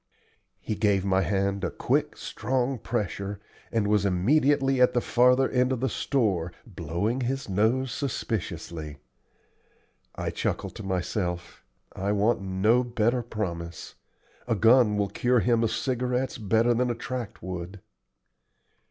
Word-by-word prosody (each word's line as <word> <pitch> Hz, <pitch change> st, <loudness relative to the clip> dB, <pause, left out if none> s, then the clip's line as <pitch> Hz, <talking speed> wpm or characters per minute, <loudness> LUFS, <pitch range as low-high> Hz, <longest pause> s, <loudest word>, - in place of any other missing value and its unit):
He -, -, -3 dB
gave 100 Hz, -3 st, +1 dB
my 95 Hz, -1 st, +3 dB
hand 100 Hz, 0 st, 0 dB
a -, -, 0 dB
quick, -, -, -1 dB
strong 125 Hz, +3 st, -2 dB
pressure, 100 Hz, -3 st, -3 dB, 0.3 s
and 110 Hz, -3 st, +1 dB
was 105 Hz, -1 st, +3 dB
immediately 135 Hz, +7 st, +2 dB
at 125 Hz, -, +5 dB
the -, -, +4 dB
farther 125 Hz, +2 st, +4 dB
end 125 Hz, 0 st, +2 dB
of 130 Hz, -, -1 dB
the 130 Hz, +1 st, 0 dB
store, 100 Hz, -, 0 dB
blowing 100 Hz, -, -2 dB
his 135 Hz, +2 st, -2 dB
nose 110 Hz, +7 st, +1 dB
suspiciously. 85 Hz, -, -4 dB, 1.2 s
I -, -, -3 dB
chuckled -, -, -2 dB
to -, -, -7 dB
myself: 90 Hz, -2 st, -3 dB, 0.3 s
"I 100 Hz, +2 st, -1 dB
want 105 Hz, +2 st, +2 dB
no 95 Hz, +6 st, +2 dB
better 120 Hz, 0 st, +1 dB
promise. 85 Hz, -8 st, -5 dB, 0.5 s
A 115 Hz, -, +1 dB
gun 115 Hz, 0 st, +5 dB
will 100 Hz, -1 st, 0 dB
cure 120 Hz, +4 st, +2 dB
him 115 Hz, +3 st, +2 dB
of 115 Hz, -, +2 dB
cigarettes 125 Hz, 0 st, -1 dB
better 110 Hz, +3 st, +2 dB
than 125 Hz, +1 st, +1 dB
a 120 Hz, -, -1 dB
tract 125 Hz, -4 st, -6 dB
would." 90 Hz, +2 st, -6 dB
110 Hz, 135 wpm, -27 LUFS, 95-125 Hz, 1.2 s, at